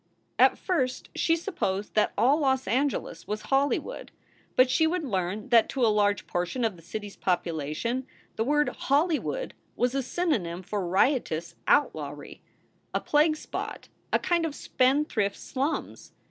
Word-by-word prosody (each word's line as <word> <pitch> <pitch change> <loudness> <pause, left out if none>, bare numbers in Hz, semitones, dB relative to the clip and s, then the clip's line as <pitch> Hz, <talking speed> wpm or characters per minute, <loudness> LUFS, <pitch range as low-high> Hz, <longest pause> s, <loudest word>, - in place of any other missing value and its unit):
At - - +6
first 260 -9 -1
she 330 - +2
supposed 265 - -3
that 215 - +3
all 260 +8 +4
Los 265 -3 +1
Angeles 260 - -1
was 210 +1 -3
Hollywood. 275 +1 0 0.4
But 255 - +6
she 320 +5 +3
would 350 +1 -1
learn 195 -4 -2
that 230 -2 +5
to 260 -3 +1
a 220 - +4
large 205 -1 +2
portion 180 +8 -1
of 215 -4 -1
the 170 - -15
city 205 +6 -6
s 200 - -10
population 175 - -2 0.3
the 220 - 0
word 295 +4 +2
"Hollywood" 320 - 0 0.2
was 245 +1 +1
a 275 - +1
synonym 235 - -1
for 195 -1 -3
riotous 175 - +1
outlawry, 290 0 0 0.5
a - - +3
plague 305 +1 +3
spot, - - -6 0.2
a - - +4
kind 345 -2 +1
of 315 -3 -2
spendthrift 255 -6 +1
slums. 275 +4 -3
255 Hz, 150 wpm, -27 LUFS, 200-295 Hz, 0.5 s, At